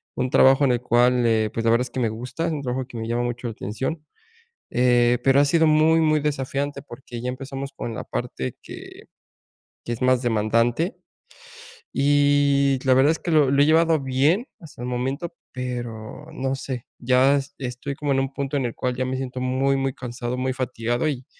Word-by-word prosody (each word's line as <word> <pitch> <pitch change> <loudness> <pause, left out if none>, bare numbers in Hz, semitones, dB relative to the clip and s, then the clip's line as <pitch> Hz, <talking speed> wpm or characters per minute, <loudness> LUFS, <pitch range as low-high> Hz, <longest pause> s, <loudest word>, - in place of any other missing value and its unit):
un 130 0 -1
trabajo 135 +2 +5
en 130 - +3
el 120 - -1
cual, 125 0 +3
eh, 110 -2 +2
pues, 115 - -2
la 115 - +3
verdad 120 +2 +3
es 125 - -7
que 130 - -3
me 115 - +1
gusta, 125 +9 -4
un 155 -3 -2
trabajo 130 0 -3
que 125 -1 -10
me 110 0 -4
llama 120 +1 -1
mucho 120 0 -3
la - - -3
atención, 130 - -4 0.7
eh, 120 -1 +3
pero 135 +1 +5
ha 145 - +5
sido 160 +3 +3
muy 155 +1 +4
muy 155 -1 +3
desafiante 140 -1 -2
porque 120 -3 -9
ya 125 - -3
empezamos 135 +1 -6
con 120 -4 -5
la - - -5
parte 65 -1 -5
que - - -11 0.8
que - - -4
es 115 - -7
más 130 -1 +3
demandante 115 - +1 0.9
y 140 -1 +3
la 130 - +5
verdad 135 +4 +5
es 160 - -3
que - - -5
lo 150 -4 +4
lo 140 0 +4
he - - +6
llevado 160 0 +4
bien 140 - +1
hasta 155 -7 -13
el 120 - -4
momento, 135 +7 -3 0.2
pero 120 +1 -6
no 135 -2 -2
sé. 130 -3 -6
Ya 130 +3 +4
es 140 0 -5
estoy 125 +2 -5
como 145 0 -2
en 135 - +1
un 135 0 -2
punto 140 +1 -2
en 135 - -1
el 120 - -4
cual 125 -1 -2
ya 130 +1 -1
me 130 +1 -2
siento 130 -1 -5
muy, 130 +2 +1
muy 135 -1 -1
cansado, 120 0 -5
muy 130 0 -1
fatigado, 120 0 -2
y 130 -4 -3
130 Hz, 205 wpm, -23 LUFS, 120-140 Hz, 0.9 s, he